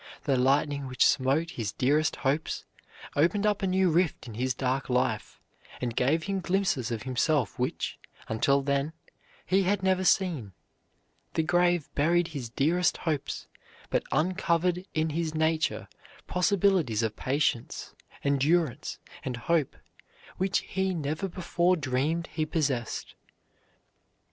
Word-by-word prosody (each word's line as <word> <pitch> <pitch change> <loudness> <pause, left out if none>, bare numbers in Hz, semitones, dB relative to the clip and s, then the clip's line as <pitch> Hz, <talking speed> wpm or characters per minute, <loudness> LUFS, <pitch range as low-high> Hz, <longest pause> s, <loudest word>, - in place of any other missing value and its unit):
The 140 - +2
lightning 140 +2 +2
which 125 0 +2
smote 140 +6 +2
his 110 -4 -4
dearest 150 +5 +2
hopes 145 +4 -1 0.5
opened 175 +8 +2
up 210 -1 +1
a 195 - +1
new 185 -1 +3
rift 170 -3 +1
in 115 - -8
his 125 +3 -1
dark 130 +1 -1
life, 125 0 0 0.4
and 120 -2 -3
gave 145 +7 +2
him 195 +1 -1
glimpses 180 - 0
of 115 -3 -3
himself 130 - 0
which, - - -2 0.3
until 140 +5 +2
then, 140 +2 0 0.5
he 190 +2 +3
had 195 +1 +1
never 185 0 +2
seen. 165 - +1 0.8
The 160 - +2
grave 175 -1 +2
buried 170 +3 +2
his 140 -7 -5
dearest 165 +9 +2
hopes, 155 -5 -3 0.5
but - - +2
uncovered 180 +2 +1
in 155 0 +1
his 160 0 -2
nature 160 0 0 0.4
possibilities 180 - +2
of 110 -1 -1
patience, 130 -3 -1 0.3
endurance, 140 +1 +1 0.3
and 125 -2 -3
hope 150 +4 0 0.6
which 190 +1 +1
he 190 -1 -1
never 155 +4 -2
before 180 0 +1
dreamed 150 +3 0
he 155 -1 -1
possessed. 135 -8 -2
155 Hz, 130 wpm, -28 LUFS, 130-175 Hz, 0.8 s, new